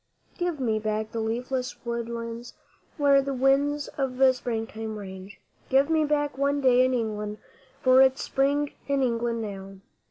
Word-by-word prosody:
Give 350 -4 -1
me 225 -4 0
back 215 0 -2
the 230 - -3
leafless 250 +4 -3
woodlands 235 0 -5 0.4
where 280 -2 +5
the 275 0 -3
winds 280 +3 +2
of 260 -2 -1 0.2
Springtime 225 -2 -4
range 190 -1 -9 0.3
Give 275 +4 +3
me 315 -1 +3
back 290 -2 -1
one 280 +1 +1
day 255 -2 +5
in 255 0 +2
England, 210 -2 -3 0.5
for 255 0 +6
it's 265 0 +3
Spring 285 +2 +1 0.2
in 280 -1 +1
England 235 -1 -1
now! 195 -2 -7
250 Hz, 150 wpm, -26 LUFS, 225-275 Hz, 0.5 s, for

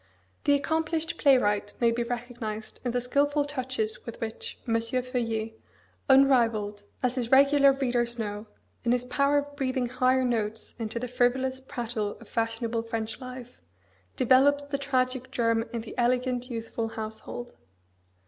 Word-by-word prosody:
The 285 - +5
accomplished 320 +2 -1
playwright 210 -7 +3
may 235 -1 +4
be 235 +1 -1
recognised 235 -3 -5
in 250 - -1
the 245 +1 0
skilful 285 +4 +1
touches 255 -6 -3
with 235 - -8
which 225 -1 -5
M. 230 - +1
Feuillet, 230 -2 -2 0.6
unrivalled, 230 -7 +4 0.2
as 250 -1 +2
his 245 -3 -2
regular 275 +1 +6
readers 240 -3 0
know, 210 -1 -4 0.4
in 240 0 +3
his 250 0 0
power 280 +3 +2
of 285 0 -2
breathing 260 -3 -1
higher 255 +1 +2
notes 225 -2 -2
into 225 0 -3
the 250 +2 -2
frivolous 260 +2 +1
prattle 235 -6 -4
of 230 - -14
fashionable 225 0 -1
French 225 +1 -4
life, 250 -1 -9 0.6
develops 270 +3 +5
the 285 -1 -3
tragic 255 -2 0
germ 230 -2 +1
in 235 -2 -3
the 225 - -9
elegant, 250 +1 +1
youthful 230 -1 -3
household. 220 +2 -7
245 Hz, 145 wpm, -28 LUFS, 230-265 Hz, 0.6 s, regular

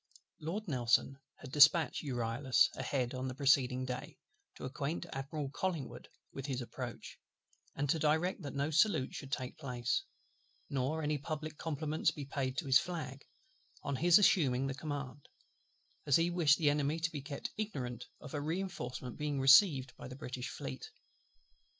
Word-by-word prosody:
Lord 190 +8 -4
NELSON 130 -1 +2 0.2
had 130 - -11
dispatched 150 +3 +6
the - - -8
Euryalus 120 +1 +2
ahead 125 -3 -1
on 130 0 -3
the 130 - -5
preceding 130 -2 +3
day, 125 -1 -5 0.4
to - - -11
acquaint 140 +5 -3
Admiral 140 +1 -4
COLLINGWOOD 165 -3 -3 0.3
with 135 +1 -6
his 130 -3 -2
approach; 120 - -7 0.6
and 145 +1 -1
to 160 +3 +1
direct 160 +5 +1
that 145 -3 -6
no 140 +3 0
salute 160 -5 +3
should 135 -2 -7
take 130 -2 -4
place, 125 - -1 0.7
nor 140 +4 -1
any 150 0 0
public 155 +1 -5
compliments 155 0 0
be 145 - -6
paid 135 -1 -3
to 170 - -1
his 135 -1 +6
flag, 150 -6 -6 0.6
on 140 - -2
his 175 +3 +6
assuming 135 -10 +4
the 135 - -2
command, 145 -1 -6 0.8
as 140 - +5
he 170 +1 +3
wished 160 -4 +4
the 150 -4 +3
Enemy 145 +1 0
to 165 +1 -1
be 145 - -5
kept 140 +1 -5
ignorant 125 - -4
of 150 - -10
a 145 - -2
reinforcement 150 -8 -4
being 150 -2 -1
received 135 -1 +6
by - - -8
the 130 - -8
British 125 -2 -5
Fleet. 65 - -6
140 Hz, 160 wpm, -34 LUFS, 130-155 Hz, 0.8 s, dispatched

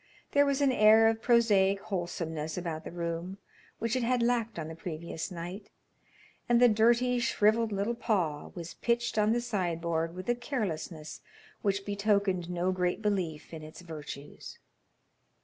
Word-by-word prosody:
There 285 0 +4
was 280 0 +1
an 275 -2 +4
air 220 -1 +6
of 225 0 -2
prosaic 205 -5 +4
wholesomeness 165 -5 -4
about 165 -3 -4
the - - -6
room 170 +2 -4 0.4
which 230 +2 -1
it 255 - +1
had 240 0 +1
lacked 235 -3 0
on 160 -2 -4
the 160 - -6
previous 165 -1 -5
night, 180 +3 -7 0.8
and 240 -1 +5
the 245 - +7
dirty, 240 +3 +3
shrivelled 225 -1 +2
little 200 +3 0
paw 185 -11 -1
was 170 -2 -7
pitched 235 -2 0
on 210 +1 +3
the 240 +1 +1
sideboard 170 -6 -1
with 185 0 -7
a 240 - +3
carelessness 185 - -4 0.4
which 200 -1 0
betokened 200 -3 +1
no 180 +1 0
great 180 -1 -1
belief 180 -7 -2
in 160 - -6
its 155 +3 -10
virtues. 150 -4 -9
195 Hz, 155 wpm, -30 LUFS, 170-230 Hz, 0.8 s, the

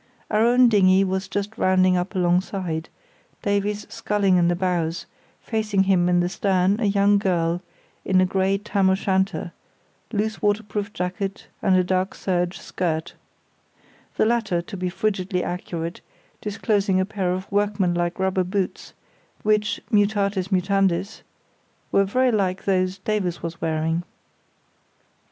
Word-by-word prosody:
Our 215 0 +3
own 245 +1 +5
dinghy 195 -3 +5
was 190 0 -2
just 205 +3 -4
rounding 185 0 +4
up 180 +3 -2
alongside, 175 -2 0 0.5
Davies 205 +1 0
sculling 200 -3 +1
in 175 -1 +3
the 175 - +2
bows, 175 -2 -1 0.4
facing 215 -4 0
him 185 -2 +3
in 175 0 +3
the 175 - +1
stern 190 +1 +1
a 235 - 0
young 200 0 +3
girl 175 -3 0 0.4
in 185 -1 +2
a 185 - +5
grey 190 +1 +1
tam 195 -1 +1
o' 190 - +4
shanter, 190 -2 -1 0.6
loose 220 0 -2
waterproof 205 -1 -1
jacket 190 +2 -4
and 185 -2 +3
dark 185 +1 0
serge 180 -1 -1
skirt, 160 -3 -3 1.0
the - - +3
latter, 220 -6 +1
to 195 - -8
be 180 -1 -2
frigidly 190 -1 -1
accurate, 170 -1 -4 0.4
disclosing 205 -2 0
a 190 - +2
pair 195 -3 -2
of 185 +1 -3
workman 200 -3 +1
like 175 0 -1
rubber 190 -1 +1
boots 190 +1 -3 0.5
which, 210 0 +1
mutatis 200 -3 +2
mutandis, 190 +1 +1 0.7
were 195 - +4
very 255 +6 +2
like 190 -4 -1
those 185 -1 +1
Davies 190 -3 -2
was 170 0 -5
wearing. 160 +1 0
190 Hz, 135 wpm, -23 LUFS, 180-205 Hz, 1.0 s, own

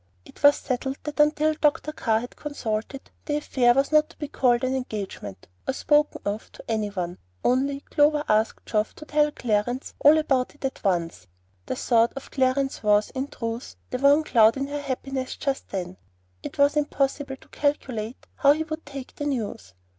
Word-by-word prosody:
It - - -16
was 285 0 +7
settled 265 +1 -3
that 300 0 -6
until 300 +1 +4
Dr. 300 0 +1
Carr 225 -7 0
had 245 - -7
been - - -22
consulted, 265 -2 -4
the 295 - 0
affair 245 -4 +3
was 275 +2 +2
not 305 0 +4
to - - -18
be 295 - -4
called 245 -4 +2
an 260 +1 +1
engagement, 200 - -6 0.2
or 265 - 0
spoken 295 +1 +2
of 205 +2 -3
to - - -12
any 220 -2 0
one; 180 -3 -4 0.2
only 275 +3 +1
Clover 295 0 +2
asked 215 +1 +1
Geoff 215 -1 -1
to 305 - -10
tell 300 0 +2
Clarence 245 0 -1
all 295 +2 +7
about 270 -4 +1
it 290 - -7
at 270 - -4
once. 175 - -1 0.4
The - - -2
thought 230 -1 +3
of 275 - -8
Clarence 265 0 +1
was, 210 0 +3
in 265 +1 -3
truth, 230 -2 -5 0.2
the 250 - -2
one 285 +3 +5
cloud 225 -4 +5
in 275 - -1
her 290 0 -3
happiness 265 -1 -3
just 275 -1 -3
then. 185 -1 -4 0.4
It - - -8
was 285 +1 +4
impossible 280 -1 0
to - - -21
calculate 255 -6 -2
how 280 0 +6
he 315 +1 -2
would 315 0 -6
take 275 -2 -8
the 290 - -4
news. 210 - -4
265 Hz, 190 wpm, -25 LUFS, 225-290 Hz, 0.4 s, was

